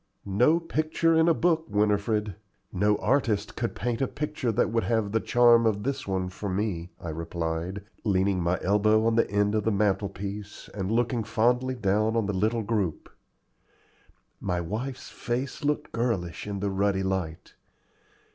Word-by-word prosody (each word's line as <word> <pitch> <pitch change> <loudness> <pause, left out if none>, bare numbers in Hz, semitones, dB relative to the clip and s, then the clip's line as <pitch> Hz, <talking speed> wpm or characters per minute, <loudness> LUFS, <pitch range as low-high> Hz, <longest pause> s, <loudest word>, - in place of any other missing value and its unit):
"No 125 - +3
picture 165 0 0
in 160 +1 +4
a - - +5
book, 165 -1 +1
Winifred 105 0 +1 0.4
no 105 +2 +2
artist 115 -6 0
could 115 0 -3
paint 120 +1 -2
a 135 - +2
picture 140 -4 -2
that 110 - +1
would 115 0 0
have 110 -3 0
the 110 - +2
charm 120 0 +5
of 105 -2 0
this 140 -1 -3
one 95 -1 -1
for 100 +2 -5
me," 95 -3 -2
I 85 - -6
replied, 85 +3 -3 0.2
leaning 95 -3 +1
my 85 +2 +1
elbow 105 +3 +3
on 115 - +3
the 115 - +2
end 105 +1 +1
of 110 -1 +1
the 110 - +1
mantel 100 -1 +1
piece, 100 +1 -7
and 95 0 -3
looking 120 0 +1
fondly 125 +4 +1
down 110 0 +1
on 115 - +1
the 100 - -2
little 110 +4 0
group. 100 -7 -2 1.3
My 90 -2 -1
wife's 115 +10 -5
face 125 +4 -4
looked 150 +1 -1
girlish 110 -8 -2
in 100 -2 -4
the 100 -1 -1
ruddy 95 0 +1
light. 95 -4 -3
105 Hz, 165 wpm, -27 LUFS, 95-120 Hz, 1.3 s, a